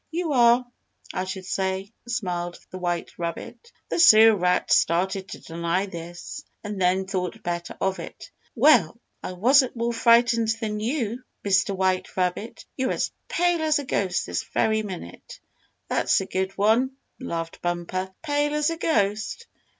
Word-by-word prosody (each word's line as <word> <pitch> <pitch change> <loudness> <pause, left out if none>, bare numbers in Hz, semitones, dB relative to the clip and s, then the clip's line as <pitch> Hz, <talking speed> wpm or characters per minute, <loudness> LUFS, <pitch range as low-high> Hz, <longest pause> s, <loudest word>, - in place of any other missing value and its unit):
"You 325 -2 -2
are, 240 0 +5 0.5
I 185 - -2
should 190 0 -6
say," 190 +2 -2
smiled 180 -7 -3
the 185 - -7
white 175 -1 -2
rabbit. 170 - -6 0.2
The - - -1
Sewer 220 -8 +8
Rat 180 -1 +1
started 190 +3 +2
to - - -8
deny 170 +3 -2
this, 170 -2 -8 0.2
and 205 -2 -5
then 185 +1 +2
thought 185 -2 -4
better 175 0 -4
of 190 0 -1
it. - - -9 0.2
"Well, 230 - +4 0.2
I 185 - -5
wasn't 255 +8 +4
more 235 0 -1
frightened 230 -1 +4
than 210 -2 -3
you, 235 0 -2 0.2
Mr. 200 0 +2
White 185 0 -1
Rabbit. 185 +5 -2
You're 260 -1 0
as - - -1 0.2
pale 350 -1 +1
as 310 -1 +2
a 285 - -4
ghost 190 -7 0
this - - -2
very 220 0 +1
minute." 185 - -9 0.5
"That's - - +2
a 190 - -3
good 190 0 -3
one," 230 +6 +2 0.2
laughed 165 -10 -5
Bumper. 175 +2 -3
"Pale 295 -1 0
as 300 +2 +1
a 330 - -4
ghost! 220 - 0
200 Hz, 155 wpm, -25 LUFS, 185-240 Hz, 0.5 s, Sewer